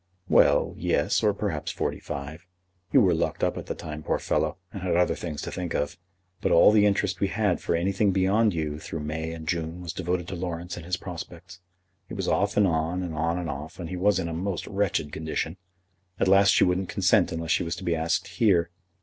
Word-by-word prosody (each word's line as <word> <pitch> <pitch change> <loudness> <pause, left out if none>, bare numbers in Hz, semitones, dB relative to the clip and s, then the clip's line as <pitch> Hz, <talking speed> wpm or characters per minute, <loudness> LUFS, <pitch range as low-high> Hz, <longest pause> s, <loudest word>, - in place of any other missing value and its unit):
"Well; - - +4
yes, - - +1
or 105 - +4
perhaps 100 -7 -3
forty - - -2
five. 75 +6 -7 0.4
You 135 - +6
were 95 -5 +4
locked 80 - -1
up - - +1
at - - -7
the - - -3
time, 75 -1 -7
poor - - 0
fellow, - - -1 0.2
and 100 - -6
had 90 -2 0
other 90 - +3
things 75 -4 -5
to - - -5
think 90 -2 -4
of; 70 0 -1 0.5
but - - +1
all 85 - +7
the 105 -1 +5
interest 100 -2 0
we 100 - +2
had 100 -2 0
for - - 0
anything 95 +4 +1
beyond 100 +4 +3
you 75 -3 -3
through 80 - -6
May 80 +2 -3
and 80 -1 -8
June 85 0 -2
was 85 -2 -6
devoted 90 -1 -2
to 95 - -4
Laurence 85 0 -4
and 85 -1 -9
his 90 +1 0
prospects. 90 +1 -9 0.5
It - - -6
was 95 -3 -3
off 100 0 +1
and 105 - +6
on, 85 +1 0
and 85 -2 -4
on 80 +2 0
and 90 -2 -3
off, 75 +5 -6
and 85 -2 -5
he 90 - -4
was 100 +3 +2
in 85 - -1
a 85 - -4
most 90 +2 -3
wretched 95 -7 -1
condition. 80 +1 -3 0.6
At - - +2
last 100 +1 +6
she - - +4
wouldn't 90 +1 +1
consent - - +3
unless 80 0 -3
she - - +3
was 85 -1 -2
to - - -9
be 85 - +1
asked 80 +3 0
here." 90 -3 +2
85 Hz, 225 wpm, -26 LUFS, 80-95 Hz, 0.6 s, all